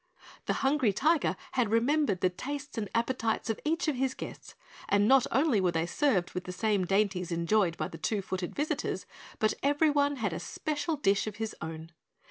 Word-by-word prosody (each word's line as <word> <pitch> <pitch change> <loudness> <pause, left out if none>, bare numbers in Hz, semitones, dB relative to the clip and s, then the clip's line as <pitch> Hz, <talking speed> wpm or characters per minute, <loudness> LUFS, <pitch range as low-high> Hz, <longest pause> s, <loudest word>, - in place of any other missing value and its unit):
The - - +2
Hungry 270 -6 +3
Tiger 310 - +2 0.2
had 245 -5 +1
remembered 230 - +2
the 185 - +3
tastes 280 +8 -6
and 210 -4 -3
appetites 230 -1 0
of 220 - -5
each 325 +2 0
of 295 -4 0
his 265 0 0
guests, - - -9 0.3
and 205 +1 +4
not 265 0 +5
only 265 -5 +3
were 180 -2 +2
they 165 0 +1
served 195 - +1
with 180 - -4
the 180 - -5
same 200 0 +1
dainties 195 -2 +1
enjoyed 170 +1 +1
by 155 - -2
the 165 - -10
Two 200 +4 -1
Footed 185 -1 -4
visitors, 295 +2 -2 0.3
but 215 - +2
every 290 +2 +3
one 285 0 +2
had 210 -9 -2
a 160 - -3
special 305 - -2
dish 200 -8 +1
of 210 - -4
his 220 0 -4
own. 160 0 -6
220 Hz, 195 wpm, -30 LUFS, 185-285 Hz, 0.3 s, not